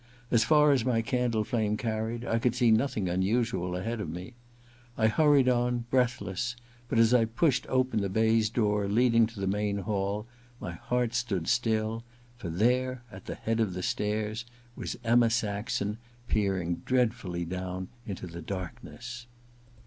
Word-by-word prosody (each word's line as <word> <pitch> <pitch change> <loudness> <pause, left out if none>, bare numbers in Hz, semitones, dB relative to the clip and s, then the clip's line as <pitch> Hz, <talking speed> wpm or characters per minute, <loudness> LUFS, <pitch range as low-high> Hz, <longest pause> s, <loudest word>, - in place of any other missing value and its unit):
As 115 -2 +5
far 150 +2 +5
as 135 -5 +3
my 115 -2 +1
candle 120 -2 0
flame 105 -1 0
carried, 115 +1 -2
I 115 - +1
could 125 +1 +1
see 120 -3 +4
nothing 110 -4 +1
unusual 95 0 0
ahead 110 +5 -3
of 85 - -4
me. 90 +8 -7 0.6
I 110 - +2
hurried 140 +3 +4
on, 120 -1 +1
breathless; 120 -3 0 0.3
but - - 0
as 115 +1 +5
I 120 -2 +5
pushed 125 +3 +1
open 130 -4 +1
the 100 - -1
baize 110 +2 +3
door 105 -3 +1
leading 115 +1 +4
to 115 -2 -11
the 95 - -1
main 100 +1 0
hall 100 +1 -2 0.3
my 90 - -5
heart 120 +7 -1
stood 110 -9 -1
still, 110 -1 +1 0.3
for 100 -8 -6
there 125 +7 +1
at 95 0 -11
the - - -4
head 115 0 -1
of 105 -5 0
the 90 - -4
stairs 105 +1 -1 0.3
was - - -5
Emma 120 0 +4
Saxon, 105 -1 -1 0.3
peering 95 -6 0
dreadfully 110 -9 0
down 90 +1 -4 0.2
into 95 -3 -5
the 85 -1 -8
darkness. 120 +6 -7
110 Hz, 160 wpm, -29 LUFS, 100-120 Hz, 0.6 s, As